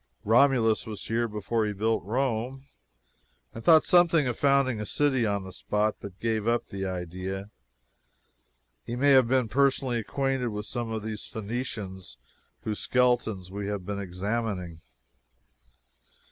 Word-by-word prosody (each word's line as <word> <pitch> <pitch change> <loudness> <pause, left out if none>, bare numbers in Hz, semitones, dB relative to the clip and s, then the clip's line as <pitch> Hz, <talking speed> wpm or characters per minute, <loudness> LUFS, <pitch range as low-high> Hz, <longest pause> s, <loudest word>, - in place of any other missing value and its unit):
Romulus 115 -1 +4
was 105 -2 -6
here 115 +1 0
before 110 +1 -1
he 105 -1 -1
built 110 +3 0
Rome, 125 +4 -2 0.9
and 115 - -8
thought 160 -2 +7
something 170 -4 +4
of 125 -2 -1
founding 135 -5 +2
a - - -2
city 130 -4 +2
on 100 -1 -1
this 95 -1 -7
spot, 105 +1 0
but 100 -2 -9
gave 110 -1 -1
up 120 0 +1
the 95 -1 -4
idea. 95 +2 -5 1.3
He 120 - -5
may 140 +3 +3
have 130 -3 +6
been 130 -1 +2
personally 130 0 +2
acquainted 135 +2 -1
with 105 -2 -4
some 120 -1 -3
of 110 -1 -3
these 110 -1 -5
Phoenicians 105 - -5 0.4
whose 105 -1 -3
skeletons 120 -7 +1
we 100 0 -4
have 100 -3 -3
been 100 +1 -3
examining. 95 -2 -3
110 Hz, 145 wpm, -27 LUFS, 100-125 Hz, 1.3 s, thought